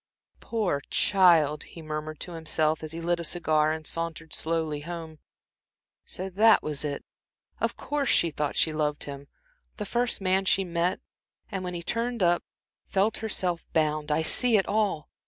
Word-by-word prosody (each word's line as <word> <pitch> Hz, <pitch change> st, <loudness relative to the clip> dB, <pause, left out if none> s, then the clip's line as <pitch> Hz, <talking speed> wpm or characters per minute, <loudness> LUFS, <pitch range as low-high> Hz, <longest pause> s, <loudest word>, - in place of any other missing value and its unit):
"Poor 205 Hz, -11 st, -1 dB
child!" 165 Hz, -6 st, +4 dB
he 165 Hz, -, -11 dB
murmured 155 Hz, 0 st, -5 dB
to 180 Hz, -, -4 dB
himself, 160 Hz, -1 st, 0 dB
as 155 Hz, -1 st, -6 dB
he 165 Hz, -, -4 dB
lit 170 Hz, +1 st, 0 dB
a -, -, -3 dB
cigar 155 Hz, -2 st, +2 dB
and 160 Hz, 0 st, -4 dB
sauntered 165 Hz, -1 st, -5 dB
slowly 160 Hz, -2 st, -1 dB
home. 160 Hz, 0 st, -7 dB, 0.9 s
"So 185 Hz, -, -3 dB
that 215 Hz, +4 st, +5 dB
was 150 Hz, -2 st, -2 dB
it. 145 Hz, -2 st, -4 dB, 0.5 s
Of -, -, -1 dB
course, 290 Hz, -2 st, -1 dB
she 170 Hz, -, +4 dB
thought 150 Hz, -1 st, -2 dB
she 160 Hz, -, +2 dB
loved 150 Hz, -1 st, -1 dB
him 140 Hz, 0 st, -8 dB, 0.5 s
the 210 Hz, -, -4 dB
first 240 Hz, +3 st, 0 dB
man 190 Hz, 0 st, +2 dB
she 195 Hz, +1 st, +3 dB
met, 175 Hz, 0 st, -1 dB, 0.5 s
and 190 Hz, -2 st, -3 dB
when 180 Hz, -1 st, -4 dB
he 170 Hz, -, -5 dB
turned 235 Hz, +1 st, -1 dB
up 175 Hz, 0 st, +3 dB, 0.4 s
felt 200 Hz, +3 st, +1 dB
herself 185 Hz, -6 st, -1 dB
bound 155 Hz, -1 st, +1 dB
I 155 Hz, +2 st, +2 dB
see 235 Hz, +6 st, +4 dB
it 195 Hz, -, +2 dB
all! 205 Hz, -8 st, 0 dB
165 Hz, 170 wpm, -27 LUFS, 155-190 Hz, 0.9 s, that